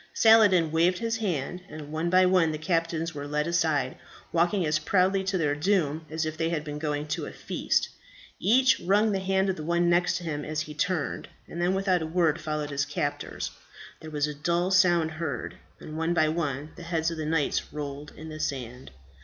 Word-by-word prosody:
Saladin 205 -8 +6
waved 170 +3 +3
his 230 +1 -1
hand, 180 -5 -2
and 150 -1 -9
one 160 +2 -1
by 185 +1 +5
one 180 -3 +3
the 155 - -3
captives 165 0 -1
were 145 -1 -6
led 150 +1 0
aside, 160 -6 +1 0.4
walking 175 +2 +2
as 155 0 +1
proudly 190 +4 +2
to 195 0 0
their 150 -4 +1
doom 160 -1 0
as 160 +1 -2
if 155 0 -3
they 165 0 0
had 160 -3 -2
been 150 -1 -6
going 150 -1 -2
to 150 - -2
a - - -7
feast. - - -1 0.5
Each 260 +4 +4
wrung 205 +5 +2
the 195 - 0
hand 190 0 +1
of 190 - -1
the 155 - -6
one 170 +2 +2
next 175 +1 +2
to 180 - -7
him 150 -3 -3
as 155 0 -2
he 150 0 -6
turned, 160 0 -2 0.2
and 170 - -6
then 180 +2 +2
without 190 -2 +1
a 160 - -3
word 165 -2 +1
followed 150 -1 -3
his 140 0 0
captors. - - -3 0.5
There 160 - -9
was 150 -1 0
a 150 - -4
dull 170 +5 0
sound 175 -3 +4
heard, 160 -3 -4 0.3
and 155 - -9
one 165 +2 0
by 155 -2 +3
one 150 -2 -2
the - - -9
heads 165 -1 -1
of 165 - -5
the 155 - -3
knights 155 -2 0
rolled 145 0 -6
in 160 +1 -8
the 155 0 -8
sand. 125 -3 -4
165 Hz, 210 wpm, -27 LUFS, 150-180 Hz, 0.5 s, Saladin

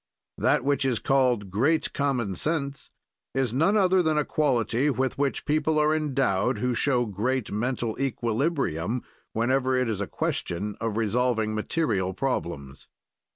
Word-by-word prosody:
That - - +2
which 140 0 +1
is 130 -3 +1
called 125 -8 +1
great 140 +11 +1
common 130 -8 0
sense 140 - -2 0.5
is 130 -4 0
none 165 +11 +3
other 190 -2 +4
than 160 -3 +1
a 150 - +2
quality 130 -3 +1
with 130 -1 -1
which 140 -1 -1
people 155 +1 +1
are 150 0 +3
endowed 130 -7 +1
who 125 0 0
show 120 +1 +1
great 115 +4 -2
mental 115 +1 -1
equilibrium 120 - -1 0.3
whenever 130 +3 +1
it 125 -1 +1
is 105 -3 -2
a 100 - -2
question 100 +4 -3
of 115 -2 -2
resolving 115 0 +1
material 105 - -1
problems. 85 - -3
125 Hz, 145 wpm, -26 LUFS, 110-140 Hz, 0.5 s, other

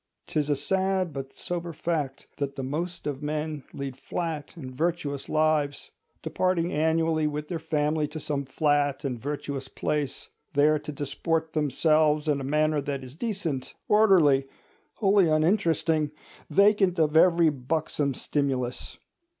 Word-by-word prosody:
'Tis 150 -1 -1
a 145 - +3
sad 190 +1 0
but 135 -1 -6
sober 175 -1 -4
fact, 150 -4 -3
that 140 -1 -3
the 135 - -4
most 165 +7 -4
of 145 -2 -3
men 150 -1 -3
lead 140 -2 -5
flat 160 +2 -4
and 130 -5 -7
virtuous 155 -3 -2
lives, 155 -2 +1 0.3
departing 180 -1 0
annually 160 0 +2
with 150 0 -4
their 170 - -2
family 155 -1 0
to 155 - -7
some 145 -2 -2
flat 145 0 +1
and 125 -3 -2
virtuous 140 0 -4
place, 150 -3 -3 0.2
there 150 +2 +4
to 150 0 -7
disport 160 +3 -2
themselves 155 +1 +2
in 145 -2 +1
a - - -4
manner 150 +2 +1
that 140 -1 -4
is 130 0 -10
decent, 170 - -3
orderly, 175 -11 +5 0.5
wholly 195 -4 +4
uninteresting, 160 -2 +2 0.4
vacant 200 -2 +4
of 155 -1 +2
every 170 0 +6
buxom 145 0 -1
stimulus. 130 -4 -2
150 Hz, 140 wpm, -27 LUFS, 140-165 Hz, 0.5 s, every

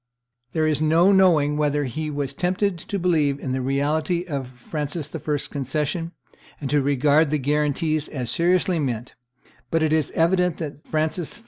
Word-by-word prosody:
There 160 -1 +1
is 155 -1 +1
no 165 +5 +4
knowing 165 -7 +4
whether 150 -1 +1
he 155 +4 -3
was 145 -2 -3
tempted 185 0 0
to 200 - -4
believe 155 -6 +1
in 135 - -4
the 130 0 -1
reality 150 +6 0
of 140 -7 -4
Francis 145 +4 -4
I.'s 150 -2 -2
concession, 150 +5 -2 0.5
and 135 -3 -4
to 145 -1 +3
regard 145 +3 +3
the 150 - +1
guarantees 150 +2 0
as 125 -5 -2
seriously 180 0 +2
meant; 120 -4 -3 0.6
but 165 -1 +1
it 155 -1 +2
is 155 -3 +1
evident 180 0 +2
that 150 -3 -6
Francis 155 +1 -2
I. - - -19
150 Hz, 165 wpm, -23 LUFS, 140-165 Hz, 0.6 s, no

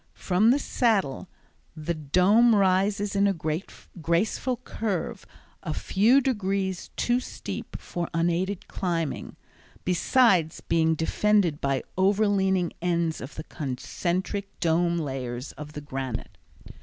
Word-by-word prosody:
From 195 +4 +3
the 260 - +5
Saddle 200 - 0 0.5
the 155 +2 -2
Dome 185 +10 +4
rises 200 +1 +2
in 200 0 +4
a 195 - +1
graceful 170 +7 -2
curve 220 -3 -4 0.3
a 155 -5 -4
few 230 +8 +3
degrees 195 -7 -1
too 240 +1 +1
steep - - -7
for 175 -1 -4
unaided 175 +3 -1
climbing, 170 -5 -3 0.5
besides 180 -2 +3
being 160 -1 +2
defended 175 0 +2
by 135 -1 0 0.2
overleaning 190 -2 +2
ends 170 -2 0
of 130 - -8
the 155 - -6
concentric 175 +8 -3
dome 170 0 +2
layers 130 -4 -4
of 150 0 -10
the 150 - -6
granite. 135 -4 -5
180 Hz, 115 wpm, -26 LUFS, 160-200 Hz, 0.5 s, the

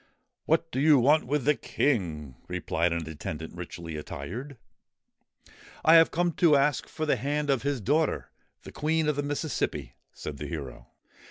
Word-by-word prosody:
'What 165 +1 +1
do 130 - -2
you 150 +1 +6
want 145 +3 +4
with 145 -1 0
the 150 - +5
King?' 85 - -1
replied 85 +1 0
an 85 -1 -2
attendant, 80 0 -6
richly 85 -2 -7
attired. 115 - -7 0.6
' - - -23
I 160 - +7
have 165 0 +8
come 175 +1 +1
to 165 -4 +6
ask 140 0 +2
for 155 -1 -4
the 150 - +2
hand 145 +1 -1
of 135 -4 +1
his 140 0 -1
daughter, 150 +9 0 0.3
the - - -10
Queen 160 +1 0
of 150 - +1
the 145 - 0
Mississippi,' 145 - -2 0.2
said 75 -2 -7
the 75 - -5
hero. 65 -6 -7
135 Hz, 170 wpm, -28 LUFS, -, 0.6 s, have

